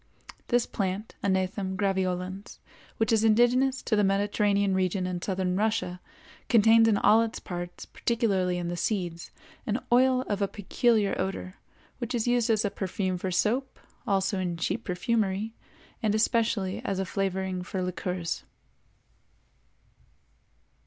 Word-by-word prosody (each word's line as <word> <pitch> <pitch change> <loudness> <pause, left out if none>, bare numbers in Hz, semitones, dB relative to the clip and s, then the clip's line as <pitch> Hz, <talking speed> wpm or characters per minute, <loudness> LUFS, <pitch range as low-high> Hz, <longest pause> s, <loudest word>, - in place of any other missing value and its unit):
This 245 -1 +2
plant, 195 +2 -3
Anethum 190 0 0
graveolens, 190 -1 -2 0.4
which 225 0 +1
is 220 -1 +3
indigenous 245 +4 +3
to 220 - +1
the 210 - +3
Mediterranean 200 0 +2
region 185 0 0
and 180 -1 -3
southern 185 -2 -1
Russia, 210 -3 -1 0.5
contains 225 0 +6
in 215 -2 +3
all 215 +3 +5
its 230 0 -2
parts, 175 -1 -6
particularly 195 -7 0
in 175 -1 -3
the 175 - -2
seeds, 175 -2 -2 0.4
an 220 +2 0
oil 255 +1 +4
of 205 -4 -3
a 200 - +2
peculiar 210 +1 +1
odor, 190 0 -4 0.4
which 245 0 -3
is 235 0 -1
used 240 -1 +2
as 215 -1 +2
a 200 - 0
perfume 185 -1 -2
for 190 - -2
soap, 240 +9 0 0.3
also 195 -1 +1
in 175 -2 -2
cheap 215 +7 -2
perfumery, 200 +2 -1 0.5
and 215 -1 +1
especially 220 -3 +1
as 195 - -2
a 190 - -1
flavoring 190 -1 -2
for 185 +1 -3
liqueurs. 180 -1 -3
200 Hz, 140 wpm, -28 LUFS, 185-225 Hz, 0.5 s, contains